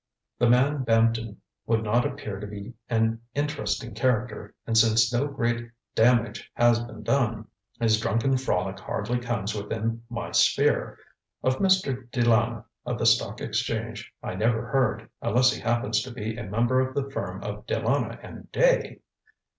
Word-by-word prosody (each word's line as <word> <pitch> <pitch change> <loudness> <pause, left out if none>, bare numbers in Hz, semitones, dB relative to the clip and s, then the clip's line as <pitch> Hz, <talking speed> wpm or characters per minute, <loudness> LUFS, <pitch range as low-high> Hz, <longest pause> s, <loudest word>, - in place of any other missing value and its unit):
The 120 - +4
man 135 +4 +3
Bampton 115 -2 +1 0.3
would 110 -1 +2
not 115 +3 +2
appear 100 -2 -6
to 105 - -6
be 100 +3 -8 0.2
an 115 -1 +1
interesting 120 -6 -2
character, 110 -4 -1
and 115 - -1
since 110 0 +4
no 130 +4 +1
great 120 -4 -2 0.2
damage 115 -1 +2
has 120 -1 +4
been 115 -2 -8
done, 115 -3 0 0.3
his 110 -2 +3
drunken 115 +5 +1
frolic 95 -7 -1
hardly 120 +4 -2
comes 115 -4 -2
within 110 +2 -3
my 115 -1 -5
sphere. - - +2 0.5
Of 130 0 +2
Mr. 140 -11 +1
De 120 -1 0
Lana, 115 -1 +2 0.2
of - - -3
the - - -1
Stock - - +3
Exchange, - - -3
I - - -4
never 110 +4 0
heard, 110 -4 +1
unless 125 +3 +4
he - - -7
happens 120 +2 +1
to 130 - -7
be 110 -2 -4
a 120 -2 -6
member 120 +5 +2
of 130 +1 -1
the 140 -1 -1
firm - - -4
of - - -6
De - - 0
Lana - - 0
and - - -11
Day? - - +2
115 Hz, 160 wpm, -26 LUFS, 110-125 Hz, 0.5 s, The